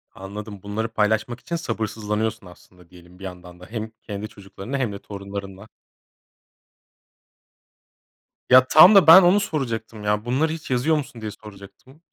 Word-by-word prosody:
Anladım 100 +1 -9
bunları 110 +3 -3
paylaşmak 110 +3 0
için 170 - -5
sabırsızlanıyorsun 110 - -3
aslında, 90 0 -19
diyelim, 90 0 -18
bir - - -13
yandan 90 -1 -10
da, 90 - -12
hem 110 -1 -6
kendi 105 0 -7
çocuklarınla 100 +6 -8
hem 125 -6 -2
de 100 - -8
torunlarınla. 100 0 -9 2.8
Ya 130 0 +7
tam 185 +6 +8
da 190 -5 +6
ben 175 +4 +10
onu 180 +4 +4
soracaktım, 115 - -4
ya 105 +2 -1
bunları 145 +6 0
hiç 160 - -9
yazıyor 135 +6 +1
musun 125 -5 -7
diye 105 -1 -5
soracaktım. 105 +9 -15
110 Hz, 145 wpm, -22 LUFS, 100-130 Hz, 2.8 s, ben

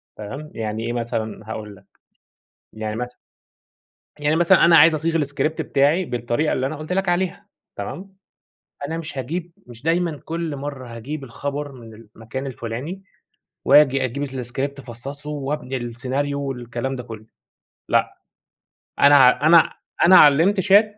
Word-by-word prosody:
تمام، 135 +9 -8
يعني 110 0 -4
إيه 120 - -2
مثلًا، 115 -2 -3
هاقول 105 -2 -6
لك، 95 - -20 0.9
يعني 110 0 -4
مثلًا 125 +1 -5 1.1
يعني 150 +2 +2
مثلًا 175 +2 +5
أنا 170 -1 +7
عايز 160 +2 +7
أصيغ 165 +2 0
الScript 145 +3 -2
بتاعي 145 +7 +2
بالطريقة 120 +3 -1
اللي 130 - 0
أنا 155 +3 -4
قُلت 155 +3 -6
لك 190 0 0
عليها 175 0 -1 0.3
تمام، 195 +1 -7 0.7
أنا 165 +3 -4
مش 160 -4 -7
هاجيب 165 +7 -4
مش 120 -1 -13
دايمًا 165 -1 0
كل 165 -3 -3
مرّة 135 -4 -7
هاجيب 140 +5 -6
الخبر 145 +3 -5
من 115 -4 -12
المكان 115 +4 -8
الفلاني، 130 - -6 0.6
وآجي 135 -2 +5
أجيب 140 +4 -3
الScript 135 +1 -4
افصّصه 140 +4 -9
وأبني 145 -2 -3
السيناريو 130 +4 -3
والكلام 130 -1 -4
ده 125 - -6
كلّه. 110 -2 -10 0.6
لأ، - - +1 0.8
أنا 140 -1 +6
أنا 165 0 +6 0.3
أنا 185 +2 +8
علّمت 165 +8 +5
chat 195 +4 +6
140 Hz, 140 wpm, -22 LUFS, 120-155 Hz, 1.1 s, أنا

